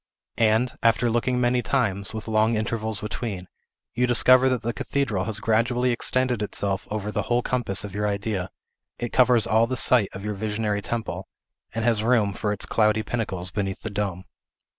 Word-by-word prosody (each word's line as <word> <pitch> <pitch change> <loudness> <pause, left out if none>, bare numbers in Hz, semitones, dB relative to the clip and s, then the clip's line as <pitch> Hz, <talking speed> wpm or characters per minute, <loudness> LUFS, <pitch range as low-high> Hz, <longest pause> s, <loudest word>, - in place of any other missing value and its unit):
And, 115 +2 +2
after 115 +1 +2
looking 125 +2 0
many 125 0 +2
times, 100 -8 0
with 110 0 -7
long 110 +1 +2
intervals 110 -1 0
between, 105 -4 -5 0.5
you 125 +1 +1
discover 130 +2 +6
that 125 -2 -1
the 120 +1 -2
cathedral 110 -12 -2
has 110 -1 -2
gradually 120 +3 +1
extended 125 -1 0
itself 100 -1 -3
over 105 0 -3
the - - -1
whole 120 0 0
compass 120 -7 +1
of 100 -2 -7
your 105 +1 -1
idea; 100 -2 -2 0.5
it 120 - -5
covers 125 -3 +4
all 110 +3 +3
the 130 +1 -3
site 120 -7 +4
of 95 +2 -8
your 105 - -2
visionary 105 0 -2
temple, 115 +1 -4 0.5
and 115 0 -1
has 115 -3 +2
room 110 -3 +2
for 105 +1 -2
its 105 - -3
cloudy 110 0 +1
pinnacles 95 -6 -3
beneath 95 -1 -3
the 110 - -4
dome. 100 -3 -3
110 Hz, 180 wpm, -24 LUFS, 105-120 Hz, 0.5 s, discover